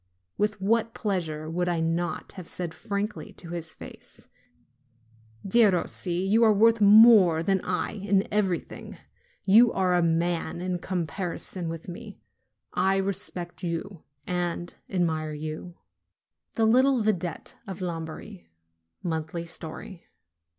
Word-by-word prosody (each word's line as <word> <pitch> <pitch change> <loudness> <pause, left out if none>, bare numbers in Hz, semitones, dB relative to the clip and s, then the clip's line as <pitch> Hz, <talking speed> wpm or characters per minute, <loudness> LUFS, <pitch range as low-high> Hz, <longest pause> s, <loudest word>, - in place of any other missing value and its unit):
With 210 0 0
what 225 +3 +1
pleasure 165 -7 -2
would 175 +2 -1
I 170 -1 0
not 165 +2 -2
have 185 -3 -10
said 175 -3 -5
frankly 200 -4 -4
to 170 - -12
his 165 -2 -5
face: - - -12 1.2
"Derossi, 190 -3 +2
you 220 +4 +4
are 220 - +6
worth 225 +2 +4
more 205 -6 +7
than 190 +1 +1
I 180 0 -1
in 200 -1 0
everything! 195 -5 -2 0.5
You 225 +4 +7
are 185 -2 +1
a 175 - +3
man 170 0 0
in 180 0 -2
comparison 180 0 -3
with 165 0 -7
me! 205 +4 -9 0.5
I 190 +2 +2
respect 185 -2 -3
you 175 0 -4 0.2
and 175 -1 -2 0.2
admire 160 -4 -1
you!" 155 +3 -6 0.8
THE 225 - +3
LITTLE 255 +2 +4
VIDETTE 180 -6 -2
OF 190 -1 -6
LOMBARDY 160 - -6 0.6
(Monthly 160 0 -3
Story.) 170 +2 -7
180 Hz, 120 wpm, -27 LUFS, 170-200 Hz, 1.2 s, more